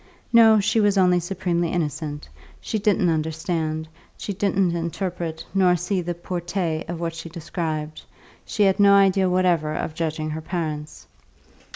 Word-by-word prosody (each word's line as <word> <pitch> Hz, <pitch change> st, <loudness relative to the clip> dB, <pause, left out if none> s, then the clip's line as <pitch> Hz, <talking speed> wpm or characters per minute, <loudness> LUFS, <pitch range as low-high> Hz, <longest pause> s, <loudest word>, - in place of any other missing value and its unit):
No, 225 Hz, -2 st, +7 dB
she 205 Hz, +3 st, +1 dB
was 205 Hz, -2 st, +3 dB
only 180 Hz, -2 st, +4 dB
supremely 175 Hz, -1 st, -1 dB
innocent; 150 Hz, -3 st, -3 dB, 0.3 s
she 220 Hz, -, -3 dB
didn't 195 Hz, -4 st, +2 dB
understand, 160 Hz, 0 st, -2 dB, 0.3 s
she 205 Hz, -, -4 dB
didn't 195 Hz, -2 st, +1 dB
interpret 170 Hz, -1 st, -4 dB
nor 185 Hz, -2 st, +4 dB
see 180 Hz, +2 st, -1 dB
the 175 Hz, 0 st, -4 dB
portée 175 Hz, -2 st, -3 dB
of 175 Hz, -1 st, -4 dB
what 165 Hz, -1 st, -3 dB
she 165 Hz, 0 st, -8 dB
described; 155 Hz, -2 st, -4 dB, 0.4 s
she 210 Hz, -, 0 dB
had 195 Hz, 0 st, +3 dB
no 200 Hz, 0 st, +7 dB
idea 195 Hz, -1 st, +4 dB
whatever 175 Hz, -4 st, +1 dB
of 155 Hz, -, -3 dB
judging 155 Hz, -1 st, -3 dB
her 160 Hz, +1 st, -4 dB
parents. 155 Hz, -3 st, -5 dB
175 Hz, 150 wpm, -23 LUFS, 160-190 Hz, 0.4 s, No